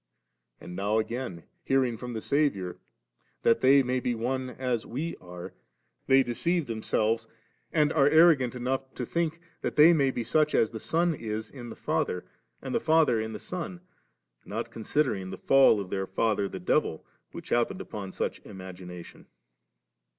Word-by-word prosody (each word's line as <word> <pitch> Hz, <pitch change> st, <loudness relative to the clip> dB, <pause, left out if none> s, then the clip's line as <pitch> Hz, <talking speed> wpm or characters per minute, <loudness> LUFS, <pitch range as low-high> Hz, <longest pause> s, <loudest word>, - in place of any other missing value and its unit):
And 90 Hz, -, -9 dB
now 100 Hz, +3 st, 0 dB
again 110 Hz, -6 st, -3 dB, 0.2 s
hearing 130 Hz, -3 st, +2 dB
from 125 Hz, +2 st, -7 dB
the 110 Hz, -, -4 dB
Saviour, 140 Hz, -12 st, 0 dB, 0.7 s
^that 115 Hz, -, +5 dB
they 135 Hz, +2 st, +6 dB
may 125 Hz, 0 st, 0 dB
be 125 Hz, -1 st, -1 dB
one 130 Hz, +3 st, -2 dB
as 125 Hz, -3 st, -2 dB
We 150 Hz, +8 st, -4 dB
arc 90 Hz, -1 st, -9 dB
•,' -, -, -37 dB, 0.5 s
they 135 Hz, 0 st, +6 dB
deceive 165 Hz, +7 st, 0 dB
them 115 Hz, -3 st, -5 dB
selves, 110 Hz, +1 st, 0 dB, 0.4 s
and 150 Hz, -1 st, +2 dB
are 140 Hz, -2 st, +5 dB
arrogant 155 Hz, -6 st, +5 dB
enough 130 Hz, +2 st, -2 dB
to 125 Hz, -, -3 dB
think 165 Hz, +3 st, -1 dB, 0.2 s
that -, -, -3 dB
they 160 Hz, +3 st, +8 dB
may 140 Hz, -4 st, +3 dB
be 120 Hz, -2 st, -2 dB
such 155 Hz, +4 st, +2 dB
as 110 Hz, -, +3 dB
the 110 Hz, -, -6 dB
Son 170 Hz, +7 st, +1 dB
is 110 Hz, -5 st, -5 dB
in 120 Hz, -4 st, -9 dB
the -, -, -8 dB
Father 90 Hz, -, -1 dB, 0.4 s
and -, -, -4 dB
the -, -, +2 dB
Father 155 Hz, -8 st, +3 dB
in 110 Hz, 0 st, -4 dB
the -, -, -4 dB
Son; 180 Hz, -, -6 dB, 0.6 s
not -, -, -5 dB
considering 110 Hz, -5 st, -1 dB
the 95 Hz, -, -6 dB
fall 135 Hz, -3 st, +5 dB
of 95 Hz, -2 st, -6 dB
their 95 Hz, -1 st, -2 dB
'father 100 Hz, 0 st, 0 dB
the -, -, -6 dB
devil 155 Hz, -, 0 dB
>,' -, -, -48 dB
which -, -, -9 dB
happened 120 Hz, +10 st, +1 dB
upon 100 Hz, -, -6 dB
such -, -, -3 dB
an -, -, -15 dB
imagination. 90 Hz, -3 st, -10 dB
125 Hz, 180 wpm, -28 LUFS, 105-145 Hz, 0.7 s, they